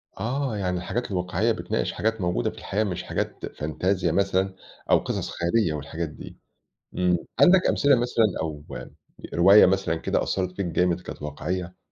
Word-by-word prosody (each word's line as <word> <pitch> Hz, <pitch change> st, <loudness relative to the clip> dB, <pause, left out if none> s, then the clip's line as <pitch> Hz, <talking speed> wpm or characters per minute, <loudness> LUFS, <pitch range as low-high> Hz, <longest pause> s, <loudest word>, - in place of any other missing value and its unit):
آه، 125 Hz, -1 st, -2 dB
يعني 90 Hz, -2 st, -1 dB
الحاجات 100 Hz, +6 st, -3 dB
الواقعية 90 Hz, +5 st, 0 dB
بتناقش -, -, -2 dB
حاجات 110 Hz, -1 st, -1 dB
موجودة 90 Hz, 0 st, 0 dB
في -, -, -12 dB
الحياة 105 Hz, +3 st, -1 dB
مش 90 Hz, -5 st, -3 dB
حاجات -, -, -3 dB
فانتزيا 85 Hz, +3 st, -1 dB
مثلًا 95 Hz, +1 st, +1 dB, 0.4 s
أو -, -, +7 dB
قصص -, -, -3 dB
خيالية 85 Hz, 0 st, +1 dB
والحاجات 80 Hz, +2 st, -4 dB
دي، -, -, -11 dB, 0.6 s
إمم، 90 Hz, -1 st, +2 dB, 0.2 s
عندك 185 Hz, 0 st, +6 dB
أمثلة 140 Hz, -2 st, +4 dB
مثلًا 120 Hz, -2 st, +2 dB, 0.2 s
أو 75 Hz, -2 st, -5 dB, 0.7 s
رواية 95 Hz, +5 st, +7 dB
مثلًا 95 Hz, -3 st, +1 dB
كده 80 Hz, -, 0 dB
أثّرت 95 Hz, -1 st, -1 dB
فيك 100 Hz, -3 st, -2 dB
جامد 90 Hz, +1 st, +1 dB
كانت 80 Hz, -, -9 dB
واقعية؟ 90 Hz, +4 st, -4 dB
90 Hz, 155 wpm, -25 LUFS, 85-105 Hz, 0.7 s, أو